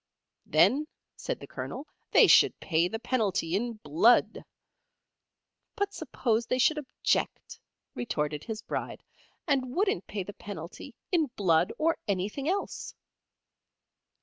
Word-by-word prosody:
Then, 300 +3 +4 0.3
said - - -4
the - - -7
Colonel, 280 - -6 0.2
they - - +7
should - - +5
pay 165 -1 +1
the 225 - -4
penalty 210 -8 0
in 235 +4 -1
Blood. 215 +4 +3 1.3
But 405 0 -1
suppose 230 -1 -1
they 255 - +1
should 305 +4 +3
object, 280 - -2 0.3
retorted 150 -10 -2
his 220 -1 -5
bride, - - -5 0.4
and 265 -4 0
wouldn't 375 - 0
pay 205 -2 -4
the 205 - -9
penalty 195 - -9 0.2
in 330 -5 +3
Blood 170 -3 +3
or 325 +1 +1
anything 205 - -1
else? 395 +2 -3
225 Hz, 120 wpm, -29 LUFS, 185-280 Hz, 1.3 s, they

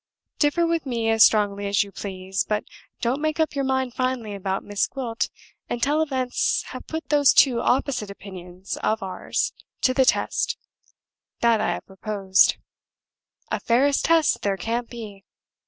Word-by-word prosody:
Differ 315 +3 +3
with 335 -3 -1
me 230 -3 0
as 225 0 +6
strongly 205 -2 +3
as 200 0 +3
you 200 - -12
please, 190 -1 -3
but 210 0 -1 0.4
don't 250 +5 0
make 310 +1 -1
up 315 -2 +1
your 280 -1 -1
mind 265 -2 0
finally 255 -5 -2
about 195 -1 -3
Miss 205 -1 0
Gwilt 235 -4 -3 0.4
until 285 +6 +1
events 260 -5 0
have - - -8
put 320 0 -5
those 290 -2 +5
two 250 -4 +5
opposite 250 -5 0
opinions 185 -2 -8
of 215 -2 -1
ours 185 -1 -2 0.3
to 255 - +3
the 265 0 +3
test - - +1 0.8
that 230 -2 +4
I - - +1
have - - -7
proposed. 195 -1 +2 1.0
A - - 0
fairer 255 +5 +3
test 325 +2 +3
there 200 -1 0
can't 230 +5 -2
be. 210 -5 -9
235 Hz, 155 wpm, -24 LUFS, 200-270 Hz, 1.0 s, as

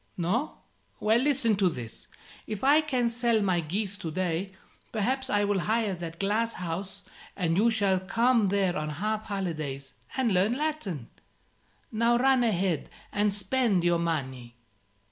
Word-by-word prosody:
No? 205 - -1 0.4
Well, 220 +2 +3
listen 255 -5 +2
to 190 -2 +3
this: 120 -7 -7 0.4
if 215 -2 -5
I 290 +3 +6
can 255 -6 0
sell 235 -1 +2
my 185 -3 +2
geese 195 +5 -2
to 165 - -5
day, 180 +2 -2 0.4
perhaps 260 +5 0
I 205 -3 +2
will 205 -1 +1
hire 215 +1 0
that 170 -2 -7
glass 220 +4 0
house, 185 +3 -5 0.3
and 165 -4 0
you 215 +5 +4
shall 200 -4 +2
come 230 +3 +2
there 190 -2 +1
on 150 0 -2
half 215 +8 -2
holidays, 155 -9 -4 0.2
and 255 -4 +2
learn 190 +5 +3
Latin. 255 - -3 0.8
Now 235 +2 +3
run 260 0 +4
ahead 190 - 0 0.2
and 205 0 +2
spend 200 -1 +1
your 175 -1 +3
money." 130 -8 -3
200 Hz, 150 wpm, -28 LUFS, 175-230 Hz, 0.8 s, I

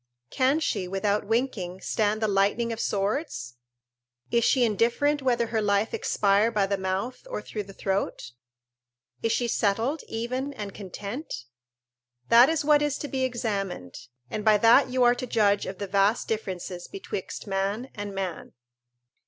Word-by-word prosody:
Can 270 +4 +2
she, 195 - -1
without 200 +2 0
winking, 220 -6 -1
stand 215 0 0
the - - +3
lightning 205 +4 +1
of 225 - -7
swords? 200 - -2 0.7
is 235 0 +3
she 255 +1 +4
indifferent 240 +7 +2
whether 240 -3 +2
her 225 -1 -1
life 205 +1 +1
expire 205 +2 +2
by 210 -4 +1
the 200 +1 0
mouth 195 - -3
or - - -3
through 215 - -5
the 195 - -11
throat? 195 -9 -2 0.9
Is 225 - +1
she 240 - +1
settled, 230 +8 0
even 255 +5 -3
and 205 -6 -6
content? 200 - -6 0.8
This 235 +3 +8
is 320 -2 0
what 295 -1 +5
is 295 -1 0
to 290 - -5
be 265 -2 -2
examined, 200 - -3 0.2
and 210 - -4
by 215 -1 +5
that 230 +5 +6
you 255 0 +2
are 240 0 +6
to 250 +1 -5
judge 205 -3 +2
of 190 - -5
the 205 - -3
vast 200 +3 +2
differences 185 -4 -4
betwixt 390 0 -6
man 200 +5 -2
and 205 -1 -6
man. 190 -3 -4
215 Hz, 160 wpm, -26 LUFS, 195-250 Hz, 0.9 s, This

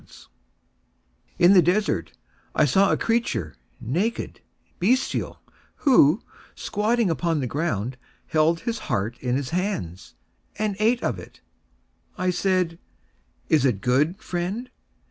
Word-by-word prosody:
III - - -18 1.3
In 185 - +8
the 185 - +8
desert 175 - 0 0.4
I 155 - +4
saw 195 +8 +3
a - - +2
creature, 225 - -1 0.3
naked, 180 - -2 0.4
bestial, 245 +9 0 0.3
who, 225 - +4 0.3
squatting 220 -1 0
upon 165 -1 0
the 135 - -1
ground, 125 - -2 0.3
Held 160 +1 +2
his 230 +3 -3
heart 115 -1 -1
in 125 -1 -1
his 135 -2 -3
hands, 160 - -3 0.4
And 210 -1 -1
ate 230 +3 +2
of - - -1
it. - - -13 0.8
I 185 -1 +1
said, 180 -2 0 0.7
"Is 155 -5 +3
it 125 -8 +2
good, 145 - +1
friend?" 190 +8 -4
175 Hz, 125 wpm, -24 LUFS, 130-210 Hz, 1.3 s, In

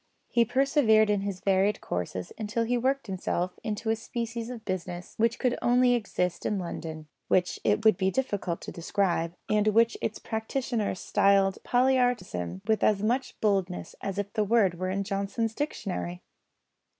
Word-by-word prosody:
He 235 -1 +3
persevered 225 -5 +4
in 205 -1 +1
his 195 -2 -4
varied 195 +1 +2
courses 90 +1 -4
until 220 +1 -1
he 240 +2 0
worked 265 +3 0
himself 185 -2 -2
into 220 +1 -2
a - - +2
species 230 0 -4
of 235 -3 -8
business 180 -2 -4
which 230 +1 +2
could 250 -2 0
exist 240 -8 +2
only - - 0
in - - -1
London, 160 -3 -6 0.2
which 180 -1 +1
it 220 - +1
would 215 -4 +6
be 190 -1 +2
difficult 205 -8 -2
to - - -7
describe, 170 -1 -1
and 210 0 +2
which 230 +2 +3
its 215 - -2
practitioner 220 -1 -2
styled 195 +1 +3
"poly 260 +2 +3
artism" 140 - -1
with 220 -1 +2
as 205 -1 +3
much 250 +4 -1
boldness 195 -4 0
as 195 -1 -4
if 205 0 -3
the 215 -2 +1
word 200 -5 +2
were 185 0 -1
in 200 +1 -1
Johnson's 200 +3 -2
Dictionary! 195 - -4
210 Hz, 165 wpm, -28 LUFS, 185-230 Hz, 0.2 s, would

